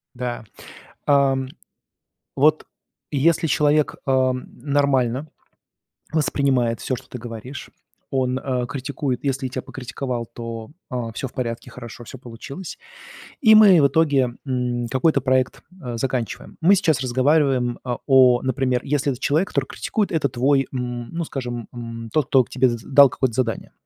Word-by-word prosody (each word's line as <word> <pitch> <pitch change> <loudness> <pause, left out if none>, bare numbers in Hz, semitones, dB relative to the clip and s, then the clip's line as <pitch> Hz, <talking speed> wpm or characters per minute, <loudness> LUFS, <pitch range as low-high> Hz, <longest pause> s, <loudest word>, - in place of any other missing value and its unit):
Да. 120 -2 -4 0.6
Ам, 135 -2 +2 0.9
вот 155 +3 +3 0.5
если 160 +3 +2
человек, 150 +1 +2
э, 130 -1 +3
нормально 135 0 0 0.9
воспринимает 135 -6 +1
всё, 130 - -2
что 130 - -14
ты 125 - -7
говоришь. 120 +3 -8 0.4
Он, 130 -1 0
э, 125 -2 -2
критикует, 135 -1 -3
если 135 -1 -1
тебя 130 0 -5
покритиковал, 125 -1 -5
то, 115 -1 -7 0.2
о, 120 -4 -4
всё 125 - -4
в 130 - -10
порядке, 115 -2 -4
хорошо 120 -1 -10
всё 130 - -10
получилось. 135 +8 -9 0.6
И 220 -6 +7
мы 200 -6 +8
в 140 - +6
итоге, 140 -4 +2
м, 125 -2 -1
какой-то 140 +4 +2
проект, 130 -1 0 0.2
э, 125 -3 -5
заканчиваем. 125 -1 -3
Мы 180 +5 +5
сейчас 165 -8 +2
разговариваем, 130 -1 +2
э, 125 -1 -1
о, 130 -3 +6
например, 130 -1 0
если 140 0 0
это 125 - -11
человек, 160 +8 +1
который 135 -2 -1
критикует, 210 -2 -2
это 155 -4 +1
твой, 135 +2 +1
м, 120 -2 -4
ну 170 0 -2
скажем, 120 -6 -5
м, 115 -1 -7
тот, 155 +1 +1
кто 130 -1 +4
к - - -19
тебе 130 0 +2
з 120 - -2
дал 140 0 +7
какое-то 130 -1 -1
задание. 120 -1 -2
130 Hz, 150 wpm, -22 LUFS, 120-140 Hz, 0.9 s, мы